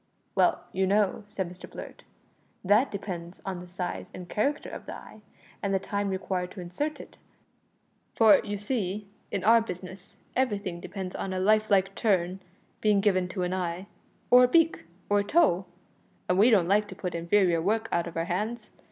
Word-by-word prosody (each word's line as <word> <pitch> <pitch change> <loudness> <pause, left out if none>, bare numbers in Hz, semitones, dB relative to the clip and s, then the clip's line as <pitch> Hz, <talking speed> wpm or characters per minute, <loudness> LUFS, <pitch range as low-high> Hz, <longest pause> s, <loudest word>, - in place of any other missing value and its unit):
"Well, - - +2
you 190 0 +1
know," 205 +1 +2
said 195 -3 -3
Mr 180 +1 -11
Blurt, - - -9 0.6
"that 210 +8 +4
depends 180 -3 -6
on 190 -2 -3
the 180 - -10
size 180 0 -5
and 180 -1 -8
character 280 +11 -1
of - - -8
the - - -5
eye, 215 - -13 0.4
and 195 -1 0
the - - +2
time 200 +1 -2
required 185 -1 -2
to - - -9
insert 285 - -3
it, - - -12 1.0
for, 220 -2 +6
you 205 -1 -3
see, 205 -2 -3 0.2
in 190 - -3
our 230 +3 +6
business 185 -2 -8 0.2
everything 205 -9 -1
depends 185 0 -6
on 190 - -3
a 185 - -1
life 215 +3 +3
like 195 -1 +3
turn 190 -4 +1 0.4
being 210 -2 +4
given 190 -3 +2
to 180 +1 -3
an 180 +1 -1
eye 180 0 -3 0.5
or 250 0 +9
a - - +2
beak 330 +4 +3 0.2
or 205 0 +3
a - - +1
toe, 200 - +3 0.6
and 180 +1 +2
we 220 +5 +7
don't 195 -7 +4
like 205 +2 +3
to - - -9
put 180 -2 -4
inferior 170 0 +2
work 215 +5 0
out 170 - 0
of 170 - -7
our 165 - 0
hands. 215 +6 -3
195 Hz, 185 wpm, -28 LUFS, 180-215 Hz, 1.0 s, or